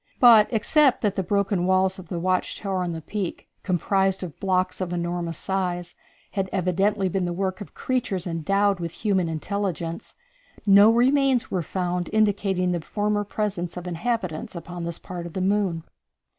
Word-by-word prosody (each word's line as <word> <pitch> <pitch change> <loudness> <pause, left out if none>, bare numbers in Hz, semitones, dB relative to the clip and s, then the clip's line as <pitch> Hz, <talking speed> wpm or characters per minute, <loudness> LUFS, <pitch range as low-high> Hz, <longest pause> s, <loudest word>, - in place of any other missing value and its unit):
But, 230 -4 +8
except 265 +5 +3
that 205 -3 0
the 190 - 0
broken 195 -1 0
walls 190 0 +2
of 185 - -10
the 175 - -4
watch 185 +2 0
tower 195 -2 -2
on 175 -1 -2
the 165 -1 -5
peak, 195 +1 -4
composed 190 +1 +1
of 170 -5 -8
blocks 185 -1 0
of 180 -2 -2
enormous 170 -2 -2
size, 180 -2 -2 0.4
had 195 -2 -2
evidently 195 +2 +1
been 185 0 -1
the 175 - -2
work 190 +2 -2
of 205 - -10
creatures 245 -8 -2
endowed 195 +4 +1
with 170 -1 -4
human 190 -5 +2
intelligence, 170 0 -3 0.5
no 200 +2 +7
remains 260 +1 +3
were 185 - 0
found 180 +1 -2
indicating 200 -4 +1
the 175 -2 -1
former 205 +4 -1
presence 200 -4 -3
of 180 - -6
inhabitants 180 -2 -3
upon 170 0 -6
this 170 0 -4
part 175 -2 -7
of 170 - -11
the - - -3
moon. 190 -4 +1
190 Hz, 170 wpm, -24 LUFS, 175-205 Hz, 0.5 s, But